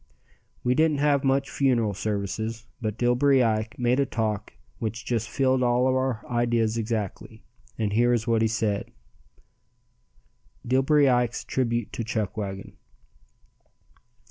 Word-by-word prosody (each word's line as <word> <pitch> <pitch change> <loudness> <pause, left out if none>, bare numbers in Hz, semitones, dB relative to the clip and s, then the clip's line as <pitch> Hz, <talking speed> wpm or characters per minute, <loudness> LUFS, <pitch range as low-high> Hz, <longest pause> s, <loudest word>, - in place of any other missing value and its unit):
We 125 - +2
didn't 155 +1 +2
have 140 -1 +2
much 135 0 +1
funeral 120 -6 +1
services, 110 +3 -3 0.2
but 110 -1 -3
Dillbery 125 +2 +3
Ike 110 -1 -1
made 125 +1 +1
a 140 - +3
talk 110 -3 -2 0.3
which 110 0 -4
just 115 -2 -1
filled 130 -1 +1
all 125 0 +2
our 130 -3 0
ideas 120 -2 +1
exactly, 110 -3 -4 0.3
and 105 -2 -1
here 120 +3 +3
is 120 -2 +1
what 115 -2 +2
he 115 - +3
said: 110 -2 -1 1.8
DILLBERY 135 +3 +3
IKE'S 120 -2 +1
TRIBUTE 120 -3 -1
TO 115 - -3
CHUCKWAGON. 105 -3 -4
120 Hz, 125 wpm, -26 LUFS, 110-130 Hz, 1.8 s, Dillbery